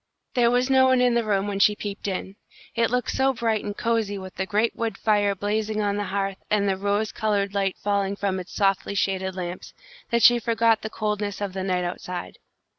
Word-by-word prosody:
There 240 -2 +4
was 245 +1 +2
no 265 -1 +5
one 260 -1 +4
in 250 -1 +3
the 235 0 +2
room 200 -2 +1
when 200 -1 -2
she 210 +1 +5
peeped 205 0 -5
in. 190 0 -4 0.4
It 230 -1 +2
looked 250 +1 0
so 265 0 +1
bright 225 -2 0
and 205 0 -5
cosy 225 -3 0
with 190 -1 -8
the 190 - -3
great 215 +3 +1
wood 225 -4 -3
fire 205 -2 +2
blazing 215 +2 -1
on 205 -1 0
the 205 - -2
hearth 195 0 -2
and 205 -1 +2
the 195 - +2
rose 205 +2 -1
coloured 205 -3 0
light 195 -2 0
falling 200 -1 0
from 195 -2 -1
its 185 - -9
softly 195 0 +1
shaded 190 -1 -1
lamps, 180 -1 -6 0.3
that 235 -1 +1
she 240 0 +7
forgot 230 -1 +2
the 220 - -4
coldness 210 -2 -2
of 200 -2 -3
the 190 - -3
night 185 -1 0
outside. 175 0 -5
205 Hz, 215 wpm, -24 LUFS, 195-225 Hz, 0.4 s, she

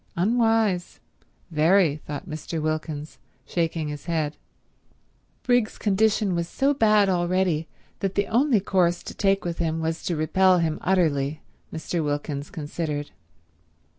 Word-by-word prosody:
"Unwise— 220 -2 +1 0.5
very," 160 0 +3
thought 150 +4 -7
Mr. 160 0 -5
Wilkins, 155 -1 -3 0.3
shaking 165 -2 -1
his 150 -1 -7
head. 155 -3 -1 1.1
Briggs's 245 -3 +2
condition 210 -1 +2
was 170 -1 -1
so 275 +8 +1
bad 215 -5 +4
already 175 -3 +1 0.3
that 195 -1 -2
the 200 - +2
only 245 +1 +3
course 180 -3 +1
to - - -7
take 195 -1 +1
with 170 -1 -3
him 165 -1 0
was 160 +1 -2
to 175 - 0
repel 185 +4 +3
him 160 -2 0
utterly, 155 -5 +1 0.3
Mr. 160 +1 -3
Wilkins 145 -1 -3
considered. 150 -1 -4
170 Hz, 130 wpm, -25 LUFS, 155-195 Hz, 1.1 s, bad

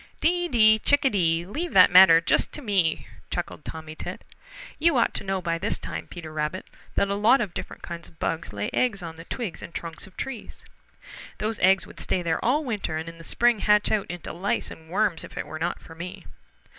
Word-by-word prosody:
"Dee, 350 +2 +2
Dee, 220 -6 +5
Chickadee! 190 -13 +2
Leave 315 - -4
that 185 -1 +7
matter 180 -2 +9
just 165 - +1
to 295 - -6
me," 190 -8 +1 0.2
Chuckled 175 -3 -4
Tommy 160 -1 -7
Tit. - - -7 0.6
"You 320 -2 +4
ought 235 - +2
to - - -2
know 190 -1 -2
by 170 -2 -1
this - - -1
time - - -6
Peter 160 -3 -9
Rabbit, 155 +4 -3 0.3
that 200 - +2
a 200 - -1
lot 215 +6 +4
of 205 -7 -2
different - - -7
kinds 170 -1 -7
of 160 - -21
bugs 165 +1 -2
lay 105 0 -3
eggs 210 -7 +1
on 165 -1 -7
the 165 +1 -11
twigs 225 -5 -5
and 170 - -10
trunks 165 0 -6
of 185 - -19
trees. 265 -5 -7 0.7
Those 215 +1 -2
eggs 190 +1 +4
would - - -13
stay 180 - -1
there 165 -1 -1
all 285 +6 +2
winter 210 - -2
and 160 +1 -5
in 165 0 -9
the - - -10
spring 240 +4 +2
hatch 210 +1 +3
out 210 -2 +1
into 175 0 -6
lice 185 +4 -2
and 160 0 -12
worms 190 -2 +1
if - - -11
it - - -3
were 155 - -7
not 165 - -2
for 165 - -13
me. 170 +2 -8
185 Hz, 220 wpm, -25 LUFS, 165-220 Hz, 0.7 s, matter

